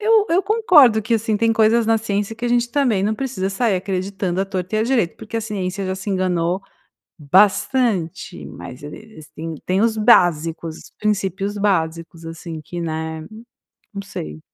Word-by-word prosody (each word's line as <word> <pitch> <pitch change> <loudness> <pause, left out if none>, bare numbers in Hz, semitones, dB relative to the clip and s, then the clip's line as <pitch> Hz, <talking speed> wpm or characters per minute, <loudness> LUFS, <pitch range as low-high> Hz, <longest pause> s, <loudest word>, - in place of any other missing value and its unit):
Eu 430 0 +4
eu 355 +3 +3
concordo 350 - +5
que, 215 +3 0
assim, 220 -1 0
tem 225 +1 +2
coisas 225 +1 +3
na 225 0 +3
ciência 210 0 -2
que 240 - -6
a - - +1
gente 240 0 +1
também 245 -8 +1
não 210 +2 +1
precisa 220 -6 -3
sair 220 +1 +1
acreditando 190 0 -2
a - - +1
torto 190 0 -4
e - - +2
a - - +2
direito, 230 -8 +1
porque 220 +1 -7
a - - 0
ciência 195 -3 -3
já 185 - -2
se 195 +2 -7
enganou 180 -1 0 0.6
bastante. 185 - +1
Mas 85 - -10
ele 145 0 -8
eles 215 -9 -14
têm 165 +1 -5
têm 185 +2 +1
os 225 -1 +2
básicos, 165 -6 +3
os - - -14
princípios 200 -1 -1
básicos, 165 -4 -1
assim, 165 0 -7
que, 175 +4 -6
né 160 -1 -4 0.7
não 200 - -4
sei. 75 - -7
195 Hz, 180 wpm, -20 LUFS, 170-225 Hz, 0.7 s, concordo